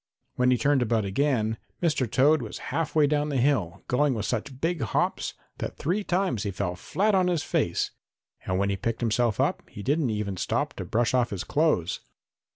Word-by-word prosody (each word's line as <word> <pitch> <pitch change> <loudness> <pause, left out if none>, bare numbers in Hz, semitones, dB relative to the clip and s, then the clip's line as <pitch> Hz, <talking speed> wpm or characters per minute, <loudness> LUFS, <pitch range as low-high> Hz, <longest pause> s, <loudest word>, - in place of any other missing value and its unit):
When 125 0 +2
he 125 - +4
turned 140 0 +2
about 115 -3 +1
again, 110 0 0 0.2
Mr. 150 -8 +1
Toad 145 +5 +4
was 110 - -6 0.2
half 165 -1 -1
way 155 -1 +6
down 150 +1 +1
the 140 - 0
hill, 120 - +1
going 135 +1 +2
with 105 -2 -2
such 125 +4 -3
big 165 0 0
hops 110 - -1 0.2
that - - -4
three 185 +7 0
times 180 - 0
he 105 - -2
fell 90 -2 -2
flat 205 - 0
on 185 -2 +3
his 175 -4 +1
face, - - 0 0.6
and 95 - +1
when 100 +1 +1
he 100 - -1
picked 115 +5 -2
himself 115 -1 +1
up - - +1
he 100 - -8
didn't 145 +1 +1
even 105 -3 -2
stop - - -1
to - - -4
brush 120 +2 +1
off 125 -2 +3
his 95 -2 -4
clothes. 150 - +1
125 Hz, 200 wpm, -27 LUFS, 105-150 Hz, 0.6 s, way